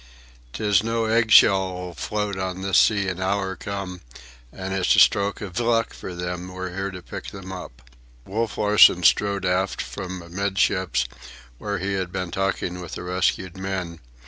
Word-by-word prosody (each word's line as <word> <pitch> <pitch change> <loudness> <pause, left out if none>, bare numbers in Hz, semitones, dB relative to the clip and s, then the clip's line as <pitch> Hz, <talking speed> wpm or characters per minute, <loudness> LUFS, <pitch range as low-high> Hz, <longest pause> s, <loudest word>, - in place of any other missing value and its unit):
"'Tis 105 -2 +2
no 115 0 0
egg 115 0 +2
shell'll 95 -4 +4
float 105 +2 -3
on 95 0 -4
this 95 0 +4
sea 100 -3 +3
an 95 0 -3
hour 95 0 -1
come, 95 -1 -6 0.5
an' 95 0 -6
it's 95 -1 +2
a - - +5
stroke 100 +1 +3
iv 100 +2 -4
luck 115 -1 +1
for 90 - -8
them 90 0 -4
we're 95 0 -6
here 95 +1 -3
to 90 -2 -9
pick - - -8
'em 95 -1 -8
up." 75 -10 -9 0.4
Wolf 110 +3 -2
Larsen 105 -4 +6
strode 100 +2 +3
aft 90 +1 0
from 95 -1 -5
amidships, 95 -4 0 0.5
where 105 -1 -3
he 95 +2 -2
had 95 -2 -2
been 90 -2 -4
talking 95 -1 -2
with 85 - -8
the - - -5
rescued 90 0 -1
men. 95 -3 -4
95 Hz, 170 wpm, -24 LUFS, 90-100 Hz, 0.5 s, Larsen